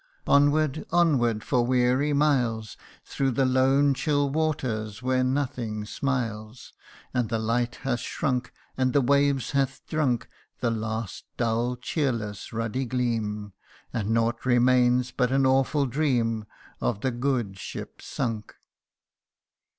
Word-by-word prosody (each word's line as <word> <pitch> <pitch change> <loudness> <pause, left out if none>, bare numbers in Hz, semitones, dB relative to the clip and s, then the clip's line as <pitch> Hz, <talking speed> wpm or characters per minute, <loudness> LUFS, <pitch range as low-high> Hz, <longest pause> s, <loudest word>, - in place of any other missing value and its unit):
Onward 145 +1 +3
onward 135 -11 +2
for 125 -1 +2
weary 125 +3 +2
miles 125 -7 +1 0.3
Through 135 -1 -1
the 135 +3 +2
lone 135 +2 +4
chill 145 0 0
waters, 125 -8 -2
where 130 0 +2
nothing 125 -5 -2
smiles, 115 -2 -3 0.4
And 125 -4 0
the 115 - 0
light 120 +2 0
hath 130 -3 -2
shrunk 125 -6 -2 0.2
And 130 -1 +1
the 140 - +4
wave 140 -1 +2
hath 135 -1 -1
drunk 130 -6 0 0.3
The 120 -2 +1
last 110 -1 -4
dull, 120 +1 0
cheerless, 120 -6 -2
ruddy 115 +4 -2
gleam, 110 -5 -2 0.4
And 105 -2 -2
naught 115 +1 +1
remains 125 0 +3
but 125 -1 0
an 135 0 +3
awful 135 +2 +3
dream 120 -5 0 0.3
Of 80 +12 -1
the 130 - 0
good 120 -6 -1
ship - - -7
sunk. 115 -5 -4
125 Hz, 125 wpm, -26 LUFS, 115-135 Hz, 0.4 s, lone